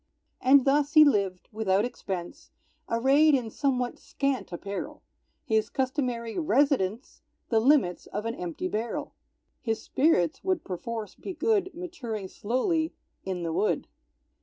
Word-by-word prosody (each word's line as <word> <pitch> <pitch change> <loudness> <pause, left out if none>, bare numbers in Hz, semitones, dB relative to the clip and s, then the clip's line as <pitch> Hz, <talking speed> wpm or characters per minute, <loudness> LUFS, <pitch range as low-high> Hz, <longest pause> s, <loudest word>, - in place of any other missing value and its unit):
And 265 0 +6
thus 285 +1 +2
he 310 -1 +9
lived, 195 -9 +1
without 210 -1 +1
expense, 185 -7 -6 0.4
Arrayed 275 +6 +4
in 235 -4 -2
somewhat 255 -3 -1
scant 275 -6 -2
apparel, 200 +3 -6 0.4
His 220 -1 +1
customary 255 -2 -2
residence 270 - +1 0.3
The 225 - +3
limits 235 - +3
of 210 - -4
an 230 - -1
empty 350 +3 -4
barrel; 230 -7 -3 0.5
(His 225 -2 -1
spirits 260 - +2
would 370 -4 0
perforce 210 +3 -5
be 380 - -7
good, 405 -4 +1
Maturing 245 - -5
slowly 315 - -1 0.3
"in 185 -2 -3
the 165 -1 -2
wood.") 210 - 0
245 Hz, 130 wpm, -27 LUFS, 210-295 Hz, 0.5 s, he